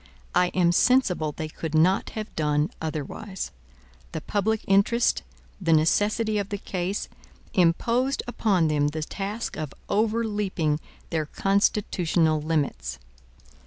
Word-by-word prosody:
I 180 - +4
am 175 -2 +4
sensible 180 - +3
they 155 +1 -5
could 160 0 -5
not 180 +5 +3
have 215 -1 -5
done 150 0 +1
otherwise. 160 +5 -4 0.6
The - - -3
public 215 +1 0
interest, 200 +5 +3 0.4
the 165 -3 +3
necessity 210 +7 +2
of 200 -1 -3
the 205 - -2
case, 190 0 -3 0.5
imposed 230 +9 +2
upon 200 -8 +1
them 145 -1 +2
the 155 +1 -3
task 205 +7 -4
of 150 -3 -5
overleaping 210 -7 0 0.3
their 155 -3 -1
constitutional 180 -5 +1
limits. 140 - -1
180 Hz, 120 wpm, -26 LUFS, 155-210 Hz, 0.6 s, I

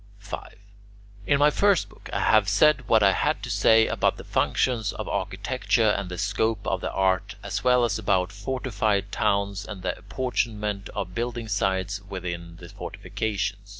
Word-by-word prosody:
5. - - -8 0.7
In 140 - +4
my 145 +1 +5
first 200 +1 +3
book, - - -15
I - - -1
have 110 -3 +4
said 130 +4 +4
what 110 -2 +4
I 100 - +6
had 95 - 0
to - - -4
say 110 0 +5
about - - +1
the - - -9
functions 115 -5 0
of 110 - -6
architecture 105 +4 0
and 100 -3 -1
the 90 - -6
scope 110 +4 0
of - - -1
the - - -2
art, 95 +2 0
as 100 0 -3
well 125 -1 +4
as 110 -2 -1
about 95 -2 +1
fortified 100 -2 -1
towns 100 -1 0
and 100 -4 -8
the 95 - -1
apportionment 105 -2 -2
of 90 -2 -4
building 120 +1 -3
sites 100 -1 -1
within 85 -3 -5
the 85 0 -12
fortifications. 100 -1 -4
100 Hz, 170 wpm, -25 LUFS, 95-115 Hz, 0.7 s, I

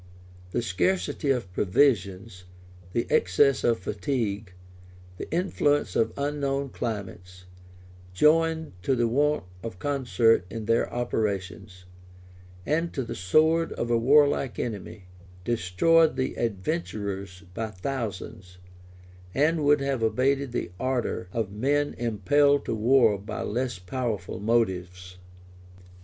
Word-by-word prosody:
The 120 +6 -2
scarcity 145 - 0
of 120 -9 -1
provisions, 95 -3 +1 0.5
the 115 +5 0
excess 135 +10 +3
of 115 -1 +3
fatigue, 100 +1 -3 0.7
the - - -7
influence 150 -4 +1
of 115 0 +2
unknown 140 -1 -1
climates, 90 -6 -6 0.7
joined 160 - +2
to 135 - +1
the 120 -1 +1
want 145 +5 +1 0.2
of 110 -4 -7
concert 125 -5 +2
in 110 +2 -6
their 115 +1 +1
operations, 100 -5 -3 0.8
and 165 +3 0
to 135 - -2
the 115 - -6
sword 160 - +2
of 120 0 -3
a 120 - +4
warlike 140 0 +3
enemy, 105 -3 -5 0.4
destroyed 120 - +3
the 130 0 -1
adventurers 100 - -3
by 110 +2 -3
thousands, 95 -4 -6 0.8
and 155 +3 +2
would 145 0 +4
have 135 -3 -1
abated 130 +4 +1
the 120 - -3
ardor 125 -8 -2
of 110 -3 -2
men 145 +7 0
impelled 140 +6 +2
to - - -2
war 115 -2 +4
by 105 +2 -5
less 120 0 -2
powerful 100 -1 -4
motives. 90 -5 -1
115 Hz, 115 wpm, -26 LUFS, 100-140 Hz, 0.8 s, a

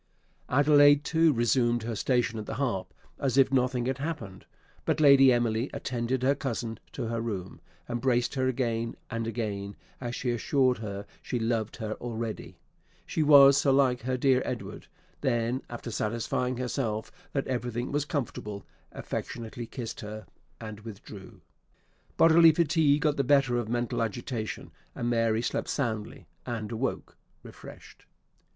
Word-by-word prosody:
Adelaide 145 +1 +6
too 160 +1 +3
resumed 120 -1 +2
her 115 0 -3
station 115 -1 0
at 105 - -7
the - - -4
harp, 105 -9 -2 0.3
as 135 -2 0
if 135 -1 +5
nothing 125 -2 +1
had 130 +1 -2
happened; 140 - -5 0.4
but - - 0
Lady 140 -3 +7
Emily 120 +1 +1
attended 125 0 -2
her 135 +2 +4
cousin 115 -5 -4
to - - -5
her 115 0 -2
room, 100 -6 -5 0.3
embraced 120 0 0
her 130 -2 0
again 115 -3 -1 0.2
and 115 -1 -2
again, 105 -3 -4 0.2
as 120 -1 -4
she 125 - -1
assured 125 +1 +1
her 100 -2 -5 0.2
she 125 - -3
loved 115 -2 -1
her 110 -2 -4
already, 115 -2 -5 0.5
she - - -2
was 140 -2 +8
so 140 -1 +3
like 130 -2 +3
her 130 +2 -1
dear 130 0 +3
Edward; - - -6 0.3
then, 120 +1 0
after 120 0 -6
satisfying 115 +3 -1
herself 120 -3 -2 0.2
that 135 - -1
everything 120 -1 -3
was 145 0 0
comfortable, 105 - -4 0.3
affectionately 115 0 -6
kissed 120 -3 -6
her, 110 0 -7 0.3
and 110 -2 -8
withdrew. 105 -2 -11 0.8
Bodily 165 0 +7
fatigue 150 -2 +2
got 150 -2 +2
the 140 - +2
better 135 -2 +3
of 115 -2 -4
mental 120 0 -1
agitation; 115 0 -4 0.2
and 120 0 -1
Mary 115 -1 +1
slept - - -2
soundly, 120 0 -3 0.2
and 115 -3 -4
awoke 120 +4 -3 0.3
refreshed. - - -13
120 Hz, 145 wpm, -28 LUFS, 115-135 Hz, 0.8 s, was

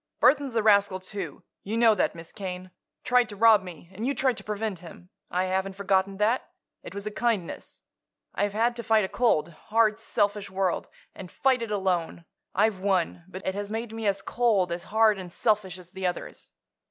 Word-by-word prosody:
"Burthon's 265 0 +3
a 225 - +2
rascal, 200 -3 +4
too. 195 +2 -7 0.2
You 215 +3 -3
know 230 -1 +6
that, 205 - 0
Miss 165 0 -10
Kane. 185 -2 -6 0.3
Tried 250 -2 +3
to 205 - -7
rob 220 -1 +6
me; 175 -2 -11
and 205 +4 -6
you 275 +3 0
tried 255 0 +2
to - - -7
prevent 210 -3 -3
him. 180 +1 -13 0.2
I 180 +1 0
haven't 190 +1 -1
forgotten 195 0 +1
that; 220 +5 +1 0.3
it - - -10
was 200 0 -5
a 215 - -3
kindness. 215 -6 -2 0.5
I've 205 0 0
had 235 +3 +1
to - - -3
fight 220 -2 +3
a - - -4
cold, 220 -9 +2
hard, 215 +6 +1
selfish 205 -2 0
world, 190 -2 -1 0.2
and 185 - -9
fight 260 +3 +1
it 230 - -3
alone. 180 -4 -1 0.3
I've 205 0 +2
won; 185 -3 0
but 185 +1 -9
it 190 - 0
has 205 +1 -4
made 225 +1 -4
me 225 -1 -3
as 195 0 0
cold, 215 -7 +1
as 170 0 -4
hard 220 -1 +3
and 180 -2 -8
selfish 205 -3 0
as 180 -1 -14
the 190 -1 -2
others. 180 - -6
200 Hz, 200 wpm, -27 LUFS, 185-225 Hz, 0.5 s, know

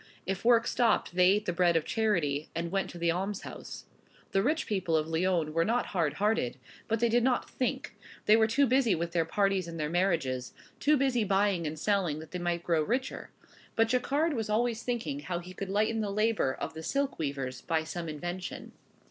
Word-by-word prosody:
If 195 0 -3
work 230 -1 +5
stopped, 230 -7 +1
they 180 0 +5
ate 205 +3 +3
the 175 - -1
bread 175 -1 +3
of 165 - +2
charity, 165 -10 0
and 170 0 -2
went 195 0 0
to - - -9
the 170 0 +1
almshouse. 195 +3 -5 0.5
The 195 - +2
rich 310 +8 +1
people 185 -6 0
of 155 0 -1
Lyons 165 -1 +1
were 165 +2 +2
not 235 +6 +1
hard 165 -6 +1
hearted, 205 - 0 0.3
but 225 0 0
they 235 - +3
did 235 +1 +2
not 250 -1 +1
think; 255 - -3 0.3
they 210 - +7
were 220 0 +4
too 275 +6 +3
busy 250 -5 +3
with 170 +1 -3
their 170 -1 +1
parties 195 0 +1
and 165 -1 -7
their 150 0 -2
marriages; 165 -9 0 0.3
too 300 +1 +4
busy 260 -4 +2
buying 195 -4 +1
and 155 +1 -5
selling 185 -3 +1
that 155 0 -10
they 180 - -4
might 175 -1 -1
grow 165 -3 +2
richer. 250 - -2 0.5
But 225 0 +3
Jacquard 280 +6 +1
was 225 -5 -3
always 230 +1 +1
thinking 245 +3 -3
how 180 -11 -3
he 180 +1 -8
could 195 +1 -5
lighten 215 +3 +1
the 210 - -2
labor 215 -7 +1
of 160 - -5
the 160 - -7
silk 275 - -1
weavers 135 -4 -3
by 160 -2 0
some 165 +1 -5
invention. 175 +4 -5
190 Hz, 205 wpm, -30 LUFS, 165-225 Hz, 0.5 s, they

